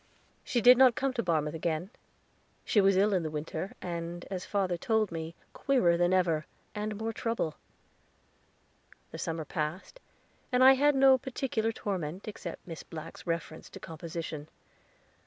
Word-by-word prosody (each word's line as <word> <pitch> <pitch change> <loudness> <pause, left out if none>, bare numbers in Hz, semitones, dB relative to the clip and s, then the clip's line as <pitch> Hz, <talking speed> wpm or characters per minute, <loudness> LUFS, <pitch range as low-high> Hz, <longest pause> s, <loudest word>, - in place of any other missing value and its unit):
She 240 - 0
did 250 +2 +8
not 255 -3 +7
come 270 -1 0
to 235 - 0
Barmouth 155 -6 0
again. 165 +3 -2 0.7
She 210 - +4
was 195 -1 +4
ill 205 +2 +4
in 185 - +2
the 160 - -3
winter, 155 +4 -4
and, 170 0 -5 0.2
father 190 -3 +1
told 220 +2 +1
me, 165 0 -5 0.2
queerer 250 -12 +3
than 175 +1 +2
ever, 170 -5 +2 0.3
and 210 0 -3
more 225 +2 -3
trouble. 230 -9 -2 1.6
The - - -7
summer 165 -1 -3
passed, 155 - -4 0.5
and 250 0 +4
I 265 +1 +10
had 290 +2 +3
no 265 -1 +6
particular 240 -3 -1
torment, 185 -4 -4
except 195 -5 -7
Miss 165 -3 -7
Black's 160 +2 -9
reference 165 -1 -4
to - - -10
composition. 160 -2 -6
185 Hz, 150 wpm, -30 LUFS, 165-225 Hz, 1.6 s, I